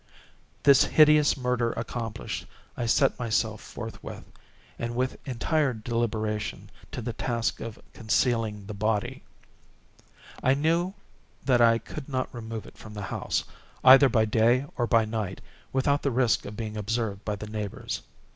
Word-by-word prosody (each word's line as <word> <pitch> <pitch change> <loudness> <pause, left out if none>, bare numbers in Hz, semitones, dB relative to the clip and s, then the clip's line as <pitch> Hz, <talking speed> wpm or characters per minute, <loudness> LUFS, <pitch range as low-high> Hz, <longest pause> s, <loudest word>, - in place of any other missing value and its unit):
This 140 -2 +7
hideous 150 -1 +5
murder 125 -2 0
accomplished, 115 -1 -5 0.3
I 120 - -2
set 135 +4 +3
myself 110 -2 0
forthwith, 115 -1 -8 0.6
and 120 0 -3
with 130 +1 -1
entire 135 +2 +1
deliberation, 110 -2 -2 0.2
to 125 - -5
the 120 0 -3
task 115 -1 -1
of 115 -1 -6 0.2
concealing 110 -2 0
the 105 - -6
body. 110 +5 -1 1.2
I 130 +1 +4
knew 170 +6 +1 0.5
that 125 -3 +4
I 115 -1 +6
could 140 +4 -8
not 130 -2 -2
remove 115 -2 -6
it - - -15
from 105 -1 -10
the 100 - -5
house, - - -1 0.4
either 135 +1 +9
by 110 -3 +3
day 115 +5 +3
or 120 -1 0
by 115 -2 +4
night, 110 -4 -3 0.3
without 140 +2 +2
the 140 - +1
risk 125 -2 +2
of 105 - -8
being 110 -2 -4
observed 105 -1 -2
by 105 - -2
the 105 - -7
neighbors. 105 -2 -4
115 Hz, 145 wpm, -27 LUFS, 110-130 Hz, 1.2 s, either